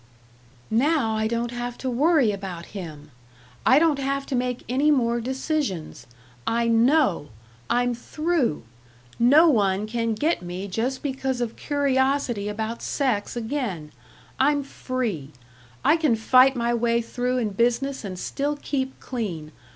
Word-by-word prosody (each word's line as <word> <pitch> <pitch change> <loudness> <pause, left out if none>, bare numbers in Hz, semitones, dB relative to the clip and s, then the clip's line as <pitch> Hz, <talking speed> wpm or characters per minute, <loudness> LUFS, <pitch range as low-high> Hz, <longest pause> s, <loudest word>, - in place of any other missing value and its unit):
"Now 245 -1 +2
I 220 0 0
don't 235 +1 -2
have 245 0 -5
to 265 - -5
worry 275 -1 +3
about 190 -4 -6
him. 160 -7 -8 0.6
I 260 - +7
don't 305 -2 +3
have 275 0 -1
to 270 - -3
make 250 0 -2
any 270 +5 +2
more 240 -5 +2
decisions. 260 - -3 0.4
I 235 0 +1
know! 230 - +3 0.4
I'm 245 0 +2
through! 305 - -1 0.6
No 285 +8 +6
one 205 -7 +2
can 230 0 -1
get 310 +9 0
me 180 +2 -5
just 235 +7 -2
because 265 -2 -2
of 235 -2 -3
curiosity 265 -6 0
about 220 +2 -4
sex 245 -8 -1
again. 225 - -3 0.5
I'm 285 +1 +3
free. 230 - -4 0.5
I 325 - +5
can 305 -8 +2
fight 255 +4 +5
my 235 0 0
way 235 0 +1
through 250 +2 -2
in 230 -4 0
business 245 +6 0
and 190 -3 -6
still 285 +9 -2
keep 265 -2 -3
clean. 180 - -5
245 Hz, 140 wpm, -24 LUFS, 220-275 Hz, 0.6 s, I